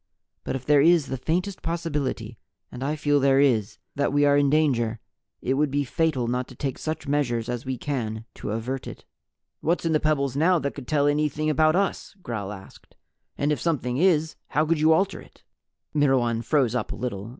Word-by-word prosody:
But - - -3
if 130 -1 -6
there 145 -1 +5
is 165 -1 +5
the - - -2
faintest 180 +8 -2
possibility 145 -9 -3 0.3
and 125 - -6
I 145 +3 -1
feel 145 -1 +2
there 135 0 +4
is 120 -8 +2 0.2
that 140 -1 0
we 145 +1 +3
are 145 0 +4
in 145 -1 +3
danger, 125 -7 +1 0.4
it 130 - +1
would 145 +2 +1
be 145 +1 0
fatal 145 -2 0
not 125 +1 -1
to 130 - -13
take 135 +1 -4
such 155 -1 -4
measures 120 -6 0
as 125 0 -4
we 130 -1 -2
can 115 -6 -3
to - - -7
avert 120 +5 -3
it." - - -10 0.5
"What's 170 +2 0
in 165 - +1
the 155 - +3
pebbles 140 -4 0
now 170 +5 +4
that 140 -3 -2
could 140 -4 -9
tell 145 -2 +2
anything 150 +1 +1
about 155 +2 +3
us?" 195 +1 -1
Gral 105 -4 -4
asked. 95 -2 -13 0.4
"And 145 +2 +1
if 150 - -1
something 130 -7 -1
is, 160 -2 +2
how 155 +1 +1
could 160 0 +1
you 155 +1 +4
alter 190 +5 +1
it?" - - -19 0.5
Myrwan 130 -6 +2
froze 130 -2 +2
up 125 - -2
a - - -4
little. 115 -4 -4
140 Hz, 205 wpm, -25 LUFS, 125-155 Hz, 0.5 s, there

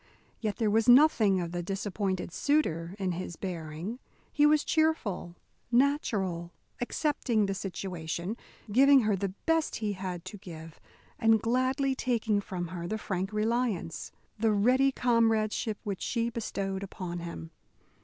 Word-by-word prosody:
Yet 215 -3 -2
there 220 -3 +1
was 225 +3 +3
nothing 245 -8 +6
of 170 -1 -3
the 175 0 -2
disappointed 195 -1 -3
suitor 185 - 0
in 190 -3 -1
his 175 0 -5
bearing. 170 +5 -5 0.3
He 295 0 +5
was 300 0 +4
cheerful, 315 - 0 0.4
natural, 210 - +1 0.3
accepting 245 -4 0
the 195 - -1
situation, 180 -1 -4 0.4
giving 275 +4 +7
her 215 -2 +2
the 195 0 -3
best 325 -1 +1
he 210 -2 -2
had 185 -3 -5
to 205 - -7
give, 165 -4 -10 0.4
and 225 -1 +5
gladly 255 +4 +1
taking 230 -5 0
from 180 -3 -5
her 170 -1 -5
the 220 - -2
frank 190 -2 -3
reliance, 215 -6 -1 0.3
the 225 0 +3
ready 255 +6 +4
comradeship 225 -3 +1
which 200 -4 -4
she 235 -1 -1
bestowed 195 -4 -3
upon 180 -3 -5
him. 80 - -7
205 Hz, 140 wpm, -29 LUFS, 180-240 Hz, 0.4 s, giving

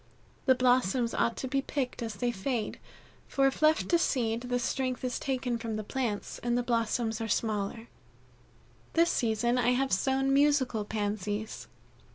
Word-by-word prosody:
The 260 - +6
blossoms 250 -2 +2
ought 230 - +1
to 260 - -3
be 275 +1 0
picked 265 -3 -3
as 225 -3 -4
they 240 +4 0
fade, 225 +1 -3 0.5
for 275 - +2
if 270 +2 0
left 310 +1 +4
to 340 - +4
seed 230 -7 0
the 245 0 -1
strength 255 +1 -2
is 250 -1 -2
taken 250 -3 -1
from 225 -1 -3
the 215 - -3
plants 225 -2 -3
and 240 0 0
the 245 - 0
blossoms 230 -1 0
are 225 - -2
smaller. 220 +1 -1 1.1
This 335 +1 +4
season 235 +2 +1
I 245 0 +3
have 265 +1 0
sown 270 +6 +2
musical 275 -6 +3
Pansies. 210 0 -3
245 Hz, 165 wpm, -30 LUFS, 220-265 Hz, 1.1 s, The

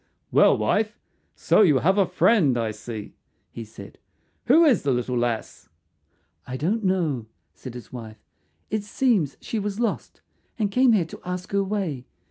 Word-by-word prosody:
"Well, - - +5
wife, 215 +1 0 0.4
so - - +3
you 155 -9 +5
have 190 +9 +2
a 195 - +3
friend, 180 - +3
I 115 -2 -1
see," 110 -1 -8 0.4
he 115 - -7
said. 105 -2 -13 0.5
"Who 320 +7 +6
is 260 - +4
the 140 - -2
little 125 -1 0
lass?" 120 -2 -3 0.8
"I 130 - -4
don't 205 - -1
know," 165 - 0 0.3
said 130 -2 -10
his 125 - -11
wife. 110 -3 -8 0.5
"It 215 -1 -1
seems 205 - 0
she 225 - -3
was 205 +1 -4
lost, 235 -3 -3 0.4
and 210 -3 0
came 250 +1 +4
here 190 -6 +2
to 160 - -11
ask 180 0 -5
her 200 0 +1
way. 190 -11 -3
180 Hz, 165 wpm, -24 LUFS, -, 0.8 s, Who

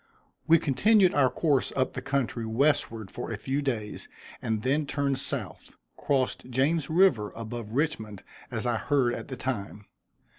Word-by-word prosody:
We 165 - +7
continued 185 - +4
our 135 -3 +4
course 145 -3 +1
up 130 -1 0
the - - -4
country 130 -4 -1
westward 115 -4 0
for 120 - -6
a 115 - -3
few 135 +7 -2
days 115 -7 -3 0.3
and 110 -1 -2
then 140 +3 +1
turned 140 -1 0
South, - - -6 0.2
crossed 130 -2 -1
James 140 +5 +1
river 155 - +3
above 115 -1 -6
Richmond, 115 -9 -2 0.3
as 115 -1 -3
I 120 -2 +1
heard 130 -2 +1
at - - -6
the 130 - -6
time. 105 -5 -4
130 Hz, 155 wpm, -28 LUFS, 115-145 Hz, 0.3 s, We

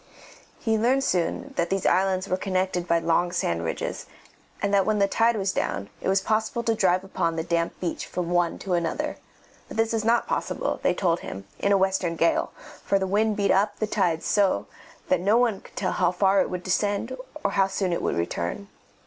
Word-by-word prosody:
He 220 -2 0
learned 260 +4 +2
soon 175 -9 -1
that 170 0 +1
these 195 -1 -1
islands 190 0 +2
were 185 - +1
connected 185 -2 -1
by 170 - +3
long 170 +1 +1
sand 85 - -1
ridges, 80 - -4 0.5
and 200 0 -1
that 200 -1 +5
when 215 +2 +1
the 200 -1 +3
tide 230 +3 +2
was 195 -2 0
down 100 - -2
it - - -3
was 190 0 +3
possible 220 +3 0
to 230 - +2
drive 185 -4 +2
upon 170 -3 -1
the 160 - -2
damp 170 0 -1
beach 175 -2 -3
from 175 -1 -3
one 175 -1 +1
to 190 - -3
another; 170 -2 -1 0.5
but - - -9
this 225 0 +1
was 225 -1 0
not 230 +2 +3
possible, - - -2
they - - +2
told 170 -3 +1
him, 95 0 -7
in 200 - +1
a 200 - +5
western 190 -3 +1
gale, 165 +1 +1 0.3
for 200 - +2
the 190 - -1
wind 210 +2 +1
beat 200 -1 +2
up 205 +2 +2
the 215 - 0
tide 180 -6 0
so 195 - +2 0.4
that 185 - +2
one 215 +2 +2
could - - -17
not - - -27
tell 185 - -1
how 180 -2 +2
far 190 +1 +3
it - - -1
would 180 -1 -4
descend 205 +6 0 0.3
or 200 - +1
how 195 -1 +3
soon 190 -2 -1
it - - -1
would - - 0
return. 85 - -3
190 Hz, 215 wpm, -25 LUFS, 175-205 Hz, 0.5 s, that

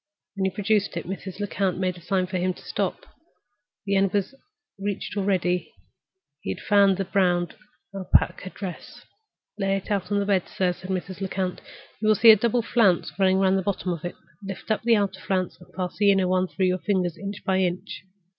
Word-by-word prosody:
When 195 -1 0
he - - +3
produced 205 -3 +1
it, 170 - -4
Mrs. 190 +1 -6
Lecount 195 -3 -1
made 185 -1 -1
a 175 - -13
sign 185 +2 0
to 185 0 -3
him 185 0 0
to - - -15
stop. - - -2 0.8
The 200 -1 +1
end 195 -1 +3
was 205 +5 0 0.5
reached 200 0 -3
already; 185 -3 0 0.7
he - - -5
had 95 - -3
found 200 -2 +4
the 195 - -1
brown 180 -2 +2 0.5
Alpaca 185 -1 +1
dress. 185 -2 -8 0.5
"Lay 195 0 +1
it 195 - -7
out 200 -1 -1
on 205 - +2
the 200 - +1
bed, 195 -3 +1
sir," 180 -2 0
said 185 +1 -11
Mrs. 190 +1 -4
Lecount. 190 -1 -2 0.4
"You 215 - -1
will 215 - +6
see 225 +3 +9
a - - +8
double 235 +2 +1
flounce 215 -7 +2
running 190 -1 +4
round 190 0 +3
the - - -1
bottom 185 -2 -1
of 170 - -7
it. 175 - -4 0.3
Lift 195 +2 -6
up 215 - +1
the 230 0 +4
outer 200 -2 0
flounce, 185 -2 -2
and 180 - -16
pass 180 -1 -3
the 205 -1 +6
inner 190 -2 +2
one 185 0 +2
through 190 +1 -1
your 185 0 +1
fingers, 180 -4 0
inch 200 +1 -7
by 190 -1 +2
inch. 180 -1 -2
190 Hz, 205 wpm, -25 LUFS, 185-200 Hz, 0.8 s, see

